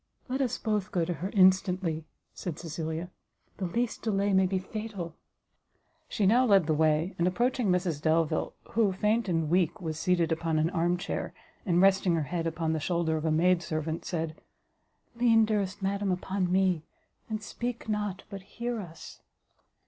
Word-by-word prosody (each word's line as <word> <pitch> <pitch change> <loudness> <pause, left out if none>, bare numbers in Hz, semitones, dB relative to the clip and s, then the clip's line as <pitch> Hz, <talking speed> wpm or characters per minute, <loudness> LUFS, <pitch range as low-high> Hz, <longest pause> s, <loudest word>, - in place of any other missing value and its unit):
"Let 265 +1 -1
us 255 -4 0
both 210 -3 -1
go 175 -3 +1
to 175 - -2
her 175 +5 -4
instantly," 185 -4 +3 0.3
said 170 -4 -5
Cecilia; 165 +1 -4 0.5
"the 190 - -2
least 235 +6 -2
delay 200 -2 +1
may 190 0 +4
be 190 +1 0
fatal." 195 -3 -5 1.0
She 205 - 0
now 235 +6 +5
led 200 -8 +5
the 155 - +1
way, 155 +3 +2
and 170 - +3
approaching 240 +5 +1
Mrs 180 -5 0
Delvile, 160 0 +1 0.2
who, 215 -3 +2
faint 210 +2 +1
and 165 -2 +1
weak, 175 0 +1
was 160 -3 -4
seated 175 -2 +1
upon 160 0 0
an 160 +2 +1
arm 175 0 +1
chair, 185 - -4 0.3
and 175 0 +4
resting 190 -2 +4
her 160 - 0
head 165 +3 -2
upon 160 0 -1
the 160 - -1
shoulder 170 0 0
of 155 0 -3
a 160 - +2
maid 175 +3 +3
servant, 160 -1 -3
said, 160 -2 -3 0.8
"Lean, 230 -2 +5
dearest 205 -2 -1
madam, 200 0 0
upon 185 0 -1
me, 185 -3 +2 0.5
and 215 -1 -3
speak 240 +2 -5
not, 210 -3 -2
but 195 -1 -6
hear 235 +4 -4
us!" 170 -5 -10
180 Hz, 170 wpm, -29 LUFS, 165-205 Hz, 1.0 s, now